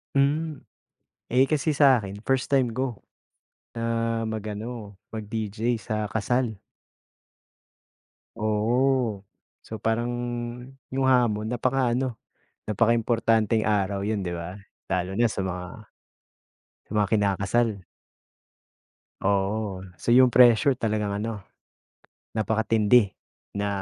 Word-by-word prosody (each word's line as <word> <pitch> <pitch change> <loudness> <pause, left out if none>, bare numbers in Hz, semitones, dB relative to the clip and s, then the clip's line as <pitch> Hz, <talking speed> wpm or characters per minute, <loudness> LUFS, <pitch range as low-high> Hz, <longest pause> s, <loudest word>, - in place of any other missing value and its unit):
Hmm. 145 +2 +1 0.7
Eh 130 +2 +4
kasi 155 +2 0
sa 140 -5 +5
akin, 100 0 -7
first 135 -1 +1
time 130 -4 +2
ko. 130 -2 -2 0.8
Na 115 0 -1
mag-ano, 110 0 -5 0.2
mag-DJ 110 +1 -3
sa 110 +1 -2
kasal. 110 0 -1 1.8
Oo. 115 +1 +1 0.4
So, 110 - -7
parang 115 +3 0 0.8
yung 135 0 0
hamon 120 -5 +3
napaka 125 0 +1
ano, 125 -1 -2 0.5
napakaimportanteng 115 0 +2
araw 100 -2 0
'yon 105 0 -1
'di 90 - -3
ba? 85 +2 -6 0.4
Lalo 90 +1 -1
na 120 - +4
sa - - -3
mga 90 -1 -3 1.2
sa - - -37
mga 105 -2 +2
kinakasal. 105 +2 +2 1.5
Oo. 100 0 -1
So, - - -3
'yong 125 0 +6
pressure 125 +3 +6
talagang 105 -4 -1
ano, 110 -3 -5 0.9
napakatindi, 110 0 +3 0.5
na 100 0 0
110 Hz, 100 wpm, -25 LUFS, 105-125 Hz, 1.8 s, yong